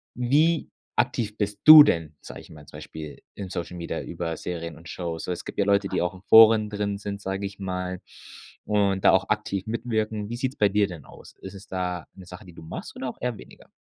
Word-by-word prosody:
wie 150 +7 +2 0.3
aktiv 105 -2 -1
bist 105 -1 -3
du 155 -1 +12
denn, 80 - -1
sage - - -10
ich - - -17
mal, 75 -2 -13
zum 75 - -11
Beispiel 75 -1 -9
in 100 -2 -7
Social 85 +1 -5
Media 85 - -4
über 80 -2 -5
Serien 85 -3 -6
und 85 +2 -14
Shows? 85 -2 -5
Also, 90 - -2
es 85 - -8
gibt - - -8
ja 100 - +3
Leute, 100 -1 +2
die - - -1
auch 90 +1 -1
in 90 - -14
Foren 110 -1 +7
drin 105 -1 -3
sind, 100 -1 -6
sage 95 +1 -4
ich 100 0 -8
mal, 90 -1 -4 0.7
und 100 -2 +1
da - - +8
auch 95 0 +2
aktiv 105 -1 -2
mitwirken. 110 -2 -2
Wie 120 - -5
sieht's 130 +2 -3
bei 105 - +3
dir 100 0 +2
denn 85 -6 -10
aus? - - -15
Ist 95 - -9
es 100 +1 -12
da 90 -2 -4
‘ne 95 - -13
Sache 90 +3 -12
die 90 - -14
du - - -13
machst 80 - -8
oder 130 - -4
auch - - -10
eher 125 -3 -2
weniger? - - -16
100 Hz, 235 wpm, -25 LUFS, 90-105 Hz, 0.7 s, du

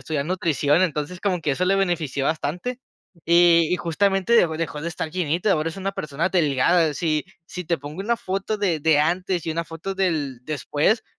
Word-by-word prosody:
estudiar 140 +1 -2
nutrición. 165 -3 +1
Entonces 165 +1 -2
como 185 -4 0
que 150 -2 0
eso 180 +7 0
le 195 +2 +2
benefició 165 -8 -1
bastante, 175 - -2 0.4
y 170 0 +6
y - - +3
justamente 195 +5 0
dejó 170 -9 +4
dejó 160 -2 -4
de 170 - -2
estar 160 -1 -4
llenita. 175 +3 0
Ahora 155 -2 0
es 165 - -8
una 195 0 -3
persona 155 0 -2
delgada. 160 0 +3
Si 155 -1 0 0.2
si 180 - -6
te 170 +1 -1
pongo 145 +5 -8
una 235 +4 0
foto 195 +1 -3
de 180 -6 0
de 155 0 +3
antes 175 +2 0
y 160 - -1
una 165 +1 -1
foto 165 +4 -6
del 155 -10 -1
después, 155 - 0
170 Hz, 195 wpm, -23 LUFS, 155-185 Hz, 0.4 s, y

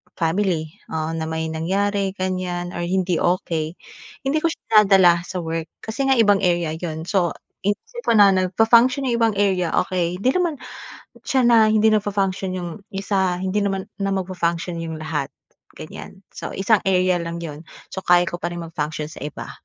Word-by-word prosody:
family, 165 -2 0 0.2
oo, 160 0 -2
na 160 -1 -3
may 160 0 -3
nangyari 195 +4 -1
ganyan 185 -2 -3
or 175 - -6
hindi 180 0 0
okey, 165 -2 -1 0.5
hindi 275 +3 +1
ko 330 - +1
siya 215 -9 +3
dinadala 185 -3 +6
sa 180 -2 -4
work 165 0 -3 0.2
kasi 265 +5 -2
nga 270 - +4
ibang 205 -4 +4
area 175 -4 +1
yun. 160 -2 -4
So, 175 -1 0 0.3
iniisip 480 - -4
ko 230 - +4
na 205 -2 +7
nagfa-function 225 +8 +3
yung - - +2
ibang 225 -2 +2
area, 190 -4 +1
okey. 180 +1 -1
'Di 255 - +4
naman 345 -1 0 0.7
siya 265 -3 +2
na 235 -2 +6
hindi 215 0 +4
nagfa-function 195 -3 0
yung 175 -2 -4 0.2
isa 190 -2 0
hindi 190 +2 0
naman 195 +1 -3
na 195 -1 -1
magfa-function 175 -2 -2
yung 165 -1 -4
lahat, 155 -3 -2 0.5
ganyan. 190 - -10
So, - - -7
isang 195 +1 +2
area 185 -1 +3
lang 170 0 -5
'yon. 155 0 -8 0.2
So, - - -6
kaya 175 0 +6
ko 175 - -5
pa 175 - -3
ring 170 - -5
mag-function 155 -2 -4
sa - - -10
iba, 150 - -8
185 Hz, 175 wpm, -22 LUFS, 170-205 Hz, 0.7 s, na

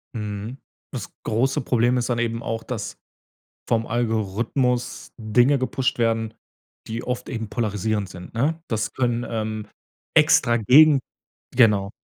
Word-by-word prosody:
Mhm, 105 +3 -5 0.4
das - - -5
große 120 +5 +1
Problem 125 0 +2
ist 120 0 -1
dann 120 -1 0
eben 115 0 -1
auch, 115 0 -3
dass - - -5 0.7
vom 115 0 +1
Algorithmus 120 +2 -1
Dinge 120 +5 +3
gepusht 130 0 -1
werden, 115 -1 0 0.5
die 115 +1 -4
oft 125 -1 -4
eben 115 -4 -4
polarisierend 105 -2 -1
sind, 90 +3 -11
ne? 150 +8 0
Das 110 -2 -1
können, 120 -2 0
ähm, 110 -1 -3 0.5
extra 120 0 +5
gegen 140 +6 +6 0.6
genau. 105 -5 +4
115 Hz, 130 wpm, -23 LUFS, 110-125 Hz, 0.7 s, gegen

